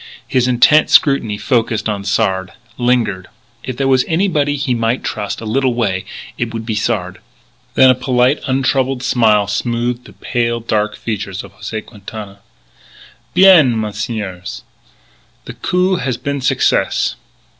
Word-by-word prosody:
His 125 -1 +1
intent 130 +5 +4
scrutiny 125 -8 +3
focussed 115 -3 0
on 105 -2 -3
Sard; 95 -3 0 0.3
lingered. 115 -7 0 0.4
If 130 -2 -5
there 135 - 0
were 130 -1 +4
anybody 160 -5 +1
he 135 -3 -1
might 115 +1 -1
trust, 105 -1 -4
a - - -7
little 125 +2 0
way, 100 -6 -1 0.3
it 120 -1 -2
would 115 0 -5
be 110 - -2
Sard. 105 -4 -2 0.6
Then 130 -1 +7
a - - +4
polite, 125 +2 +1
untroubled 130 -1 0
smile 110 -5 +3
smoothed 120 +4 -2
the - - -14
pale, 120 -1 -1
dark 105 -2 -1
features 100 -4 -4
of 100 0 -13
José 110 +1 -6
Quintana: 105 -2 -10 1.0
"Bien, 175 -11 +6
messieurs, 105 -3 -5 0.8
the - - -7
coup 185 +1 0
has 125 -5 -2
been 140 +1 -3
success. 135 0 +1
120 Hz, 140 wpm, -16 LUFS, 105-130 Hz, 1.0 s, Then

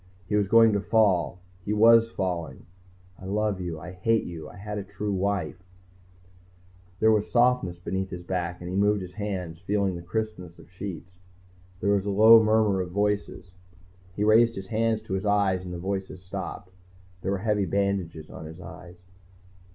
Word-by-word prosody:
He 105 - -1
was 105 -1 +2
going 115 +1 +6
to 100 - +1
fall 100 -6 +2 0.3
he 105 - -2
was 115 +1 +6
falling 85 -9 -4 0.5
I 95 - -11
love 105 0 -1
you 85 -3 -4
I 90 +4 -8
hate 110 +5 +1
you 80 -3 -8
I - - -14
had 105 +1 -5
a - - -5
true 105 +1 -4
wife... 95 -5 -2 1.4
There 110 - +5
was 105 -1 +1
softness 120 -7 +2
beneath 95 +2 -3
his 90 -1 -7
back, 90 -1 -3
and 90 - -7
he 90 - -4
moved 100 0 +2
his 90 0 -10
hands, 95 -5 -4
feeling 100 0 0
the 85 - -6
crispness 90 -2 -5
of - - -17
sheets. 90 -2 -7 0.7
There 100 - +2
was 100 0 +1
a - - 0
low 110 +3 +8
murmur 110 -3 +2
of 90 - -5
voices. 100 -1 -2 0.6
He 105 - -1
raised 115 +2 +5
his 95 -1 -7
hands 110 0 0
to 110 - -6
his 95 +2 -2
eyes 100 -3 +2
and 90 - -7
the 90 - -5
voices 95 0 -4
stopped. 90 0 -7 0.5
There 95 - -3
were - - 0
heavy 105 0 0
bandages 95 -5 -2
on 80 - -9
his 80 +2 -11
eyes. 90 -1 -11
95 Hz, 180 wpm, -26 LUFS, 90-105 Hz, 1.4 s, low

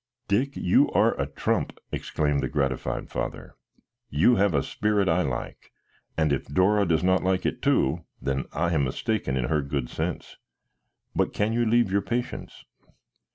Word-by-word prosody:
"Dick, 130 +8 +1
you 90 - +3
are - - +4
a - - -1
trump!" - - -1
exclaimed 75 -2 -1
the - - -2
gratified 70 -3 -1
father. - - -4 0.6
"You 90 - +4
have 100 -4 +3
a 70 - +2
spirit 105 -2 0
I 85 +1 +3
like, 65 -7 -5 0.5
and 80 -2 +2
if 70 - -2
Dora 100 +6 +3
does 80 0 +2
not 95 0 +3
like 95 0 +1
it - - -1
too, 70 +6 +2 0.2
then 70 0 -2
I 85 +2 0
am 75 -3 +2
mistaken 65 - -1
in 65 - 0
her 75 +2 +1
good 70 -3 -3
sense. - - -4 0.8
But - - +1
can 105 +2 0
you 120 0 +1
leave 115 -3 +3
your 100 +1 +2
patients?" 120 +4 -4
90 Hz, 165 wpm, -26 LUFS, 70-105 Hz, 0.8 s, are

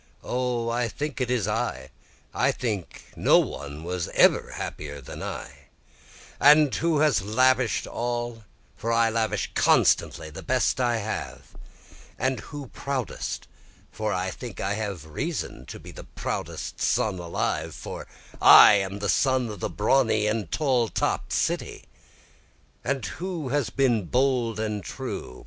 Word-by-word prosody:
O 125 -2 -1
I 120 0 0
think 145 +3 -4
it 125 - 0
is 120 -6 +1
I 65 - -2 0.4
I - - +2
think 105 -8 -5
no - - +5
one 70 +3 -3
was 90 0 -3
ever - - +4
happier 70 -1 -6
than 65 - -9
I, - - -7 0.7
And 145 0 +6
who 160 -2 +1
has 155 -2 +3
lavish'd 125 +3 +2
all? 120 -1 -3 0.3
for 115 - -3
I 115 -1 +3
lavish 110 -1 -1
constantly 80 0 +3
the - - -8
best - - +1
I 120 -2 +2
have, 110 0 -5 0.6
And 130 -1 0
who 145 +3 -8
proudest? 135 -4 -4 0.4
for 110 -1 -2
I 95 0 -1
think 115 -2 -8
I 95 +1 -1
have 100 -7 -4
reason 80 - -4
to - - -8
be - - -11
the - - -10
proudest - - -5
son 110 -7 +1
alive 85 -1 -2
for - - -7 0.3
I - - +10
am 95 0 -2
the 105 0 -3
son 130 +1 +2
of 105 -3 -7
the - - -2
brawny 110 -1 +2
and 105 -4 -1
tall 130 -6 +1
topt - - -1
city, - - -1 1.0
And 135 -5 -1
who 165 - -4
has 140 -4 0
been 120 -6 +1
bold 125 -1 +1
and 105 -2 -2
true? 65 - -6
115 Hz, 145 wpm, -26 LUFS, 100-130 Hz, 1.0 s, I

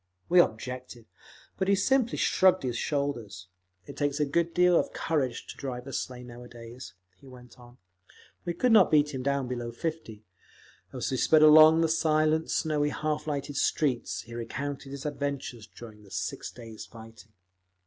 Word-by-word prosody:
_ - - -50 0.3
We 180 - +6
objected, 125 -2 -1 0.5
but 190 - 0
he 200 - +4
simply 250 +4 +1
shrugged 185 -5 +3
his 125 -2 -2
shoulders. 120 - -3 0.4
"It - - -10
takes 145 0 -1
a 150 - +2
good 170 +4 0
deal 180 0 +4
of - - -3
courage 135 -7 -2
to - - -10
drive 125 -2 -6
a 135 - -8
sleigh 125 -1 -4
nowadays," 120 -3 -11 0.2
he 135 - -18
went 125 0 -15
on. 120 0 -16 0.7
We 175 -1 -3
could 250 +7 +2
not 215 -5 +6
beat 150 -1 +3
him 130 - -4
down 140 -1 -1
below 120 -1 -4
fifty…. 120 -6 -6 0.7
As - - -4
we 130 - -1
sped 155 +4 +4
along 155 +1 +8
the 165 - +3
silent, 155 0 +1
snowy 150 -2 0
half 150 +1 -3
lighted 145 -1 -3
streets, 135 -6 0
he 120 - -13
recounted 135 +4 -5
his 140 0 -7
adventures 140 -6 -4
during 110 -3 -13
the 100 - -17
six - - -4
days' 115 -2 -10
fighting. 110 -1 -14
140 Hz, 170 wpm, -28 LUFS, 120-155 Hz, 0.7 s, along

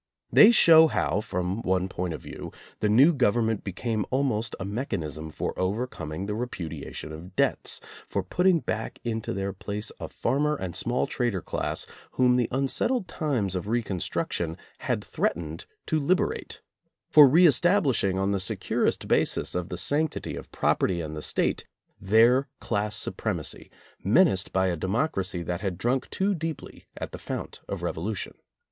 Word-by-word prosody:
They 210 - +9
show 165 -8 +8
how, 105 - 0
from 90 0 -3
one 95 -1 0
point 90 -3 -3
of - - -11
view, - - -8 0.3
the 105 - +1
new 135 +11 +6
government 115 -4 +1
became 105 +3 -2
almost 125 -5 0
a 95 - -4
mechanism 80 - -4
for - - -3
overcoming 95 -5 -3
the 105 - -3
repudiation 85 -11 -5
of 90 +4 -10
debts, - - +1 0.3
for - - -1
putting 180 -2 +2
back 110 +1 -4
into 115 -2 -3
their 95 0 -3
place 105 +3 -4
a - - -6
farmer 150 +2 0
and 95 - -5
small 120 +1 0
trader 120 -8 -2
class - - -1 0.3
whom 125 -1 +4
the 125 -2 +2
unsettled 140 - 0
times 130 - -1
of 90 +2 -3
reconstruction 95 -6 -2 0.2
had - - -2
threatened 80 -1 -3 0.2
to 160 - 0
liberate, 175 +6 -1 0.5
for 150 -3 +9
reestablishing 155 - +4
on 95 +1 +1
the 100 - 0
securest 95 - -1
basis - - +1
of 90 -1 -3
the - - -4
sanctity 155 +2 +1
of - - -9
property 90 -2 +1
and 80 -2 -5
the 75 - -5
State, - - 0 0.3
their 115 +7 +4
class 105 +1 -1
supremacy - - -2 0.3
menaced 95 0 +3
by 95 0 +2
a 90 -2 0
democracy 95 - -1
that 90 +2 -3
had 95 -4 -2
drunk 125 +6 0
too 200 +2 0
deeply 165 -3 -6
at - - -5
the - - -8
fount - - -6
of - - -4
Revolution. 95 +4 -3
105 Hz, 155 wpm, -26 LUFS, 95-135 Hz, 0.5 s, They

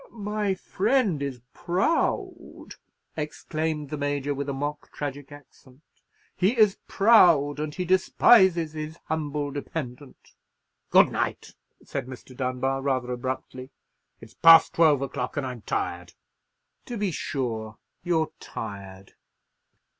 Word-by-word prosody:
"My 210 -2 -2
friend 200 - 0
is 135 -4 -4
proud," 190 - -2 0.5
exclaimed 155 -1 -4
the 150 - -4
Major, 145 0 -1
with 140 0 -4
a - - 0
mock 145 +2 -4
tragic 145 0 -6
accent; 145 -1 -17 0.5
"he 200 +7 +1
is 210 -3 +4
proud, 170 -10 +5
and 150 -1 -4
he 180 - -3
despises 185 -2 +4
his 155 +1 -6
humble 150 -2 -2
dependant." 140 -2 -7 0.6
"Good - - +6
night," - - -3 0.3
said 125 - -5
Mr. 130 0 -11
Dunbar, 130 +1 -2
rather 130 -2 -1
abruptly; 130 +1 -5 0.5
"it's 115 -1 -14
past 165 -1 +7
twelve 150 -5 +4
o'clock, 125 0 -4
and 145 - -1
I'm 125 -3 -6
tired." - - -4 0.7
"To 240 - -6
be 205 -3 -1
sure. 115 -8 -4 0.2
You're 165 -3 0
tired. 100 -3 -8
145 Hz, 120 wpm, -26 LUFS, 130-170 Hz, 0.7 s, past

